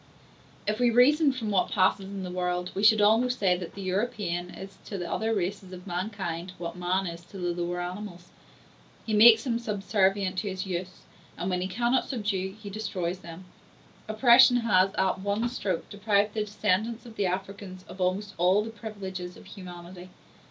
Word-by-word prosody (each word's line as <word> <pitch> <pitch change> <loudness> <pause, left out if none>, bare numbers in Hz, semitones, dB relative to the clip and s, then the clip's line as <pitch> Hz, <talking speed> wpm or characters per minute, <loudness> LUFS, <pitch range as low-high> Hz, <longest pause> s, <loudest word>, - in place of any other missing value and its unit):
If 215 +2 -1
we 245 -1 +4
reasoned 275 +4 +4
from 220 -4 -3
what 190 -2 +2
passes 190 0 +2
in 195 0 -6
the 180 - -5
world, 180 0 -2
we 195 - -3
should 215 0 +6
almost 235 +4 +4
say 185 -3 +3
that 175 -1 -7
the 200 - -6
European 185 -3 -2
is 195 +2 -10
to 200 - -5
the 175 -2 -4
other 220 +5 -1
races 190 -2 -2
of 180 0 -10
mankind, 180 -2 -4
what 170 0 -5
man 180 +2 0
is 170 -1 -6
to 195 - -12
the 175 -1 -2
lower 175 +1 -3
animals;—he 180 +3 -9
makes 220 +1 +8
them 235 -3 -1
subservient 195 -3 0
to 205 +1 -3
his 185 0 -4
use; 185 0 -5 0.4
and 180 +2 -2
when 180 0 0
he 185 - -1
cannot 240 +6 0
subdue, 200 -6 -2
he 205 -2 -8
destroys 185 -4 -3
them. 170 0 -10 0.6
Oppression 245 +3 +6
has, 195 -4 +3
at 190 0 +1
one 205 +4 0
stroke, 195 -7 -3
deprived 205 0 +1
the 215 -1 -1
descendants 215 +3 -1
of 230 -2 -11
the 200 -3 0
Africans 190 0 -5
of 185 - -9
almost 190 +3 -1
all 185 +4 +4
the 225 - -6
privileges 190 -5 -7
of - - -14
humanity. 180 -1 -10
195 Hz, 180 wpm, -27 LUFS, 180-215 Hz, 0.6 s, makes